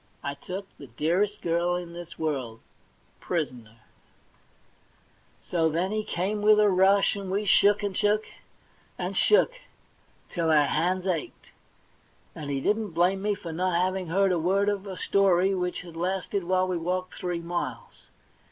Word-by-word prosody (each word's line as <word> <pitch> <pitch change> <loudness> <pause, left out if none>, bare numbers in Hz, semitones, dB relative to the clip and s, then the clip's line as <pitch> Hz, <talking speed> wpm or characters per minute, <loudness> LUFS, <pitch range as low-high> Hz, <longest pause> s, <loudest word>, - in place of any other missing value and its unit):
*I 140 - -2
took 185 +7 -7
the 140 - -10
dearest 175 - 0
girl 170 +1 +1
in 175 -1 -5
this 175 -1 -9
world 130 -8 -3 0.3
— - - -37
prisoner! 120 -10 -3 0.8
' - - -34
So 165 -2 +2
then 175 +5 -1
he 215 0 -1
came 205 +3 -2
with 210 0 +5
a 210 -1 +5
rush, 195 +3 +4
and 200 -2 -6
we 200 +3 -1
shook, 205 +1 +4
and 200 -2 -2
shook, 210 +2 +2 0.7
and - - -4
shook 475 +3 +4 0.8
till 165 -2 -1
our 150 -2 +5
hands 180 +5 0
ached; 175 -5 -4 0.8
and 150 -3 -7
he 140 -1 -1
didn't 210 +2 0
blame 180 +3 +2
me 205 0 0
for 170 -5 -7
not 180 +1 0
having 185 0 -1
heard 195 +3 +2
a 175 - +1
word 195 +5 +2
of 200 -1 -3
a 190 -2 -6
story 195 -1 +3
which 180 -1 -2
had 170 -2 -12
lasted 185 +2 -2
while 185 +1 +2
we 180 -1 -1
walked 185 +2 -2
three 180 -2 -2
miles. 175 +1 -5
180 Hz, 165 wpm, -27 LUFS, 170-195 Hz, 0.8 s, with